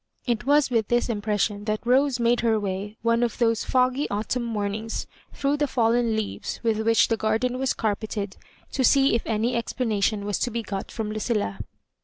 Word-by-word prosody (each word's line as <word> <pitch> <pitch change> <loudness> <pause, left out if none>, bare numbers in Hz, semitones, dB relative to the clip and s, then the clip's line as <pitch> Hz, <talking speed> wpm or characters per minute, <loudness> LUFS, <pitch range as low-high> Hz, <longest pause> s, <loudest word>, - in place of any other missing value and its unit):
It 240 -1 -1
was 290 -2 +4
with 225 -3 +1
this 240 +1 +1
impression 205 -1 -1
that 215 +1 -2
Rose 260 +1 +3
made 235 +1 +3
her 225 -2 +2
way 200 +1 -4
one 230 0 +2
of 240 -2 0
those 230 -2 +2
foggy 255 +2 +1
autumn 215 +4 -1
mornings 215 0 -3 0.3
through 285 +1 0
the 295 0 +1
fallen 235 -2 +2
leaves 215 -2 -4
with 225 -2 +1
which 225 0 +4
the 225 - +1
garden 225 +4 0
was 265 -1 0
carpeted, 210 -2 -2 0.4
to 265 - 0
see 270 +2 +5
if 230 - +2
any 225 +2 0
explanation 215 -3 0
was 205 -2 -1
to - - 0
begot 215 -4 -4
from 215 -2 -4
Lucilla. 215 - -1
225 Hz, 180 wpm, -25 LUFS, 210-245 Hz, 0.4 s, see